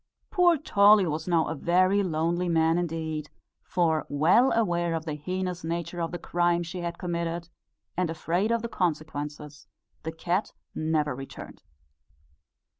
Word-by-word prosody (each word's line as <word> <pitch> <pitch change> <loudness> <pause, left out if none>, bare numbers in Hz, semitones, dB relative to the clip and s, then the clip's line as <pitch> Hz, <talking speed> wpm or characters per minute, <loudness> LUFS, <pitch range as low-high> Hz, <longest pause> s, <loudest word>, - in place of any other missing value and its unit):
Poor 355 -3 +4
Tolly 205 -7 +5
was 160 0 -3
now 170 -3 +3
a 160 - -2
very 185 +6 +3
lonely 175 0 0
man 165 0 +3
indeed; 160 -3 -3 0.3
for, 160 -3 0
well 170 - +4
aware 175 -6 +1
of 160 0 -4
the 155 - -3
heinous 180 +3 -3
nature 170 +1 -3
of 165 - -2
the 175 - -3
crime 175 0 +1
she 175 +2 -6
had 170 -1 -4
committed, 170 -1 -3 0.5
and 180 -1 0
afraid 175 +6 0
of 230 -1 +1
the - - -1
consequences, 150 -5 -3 0.3
the 160 - -4
cat 175 +5 -2 0.2
never 155 -2 0
returned. 135 +1 -9
170 Hz, 145 wpm, -27 LUFS, 160-180 Hz, 0.5 s, Tolly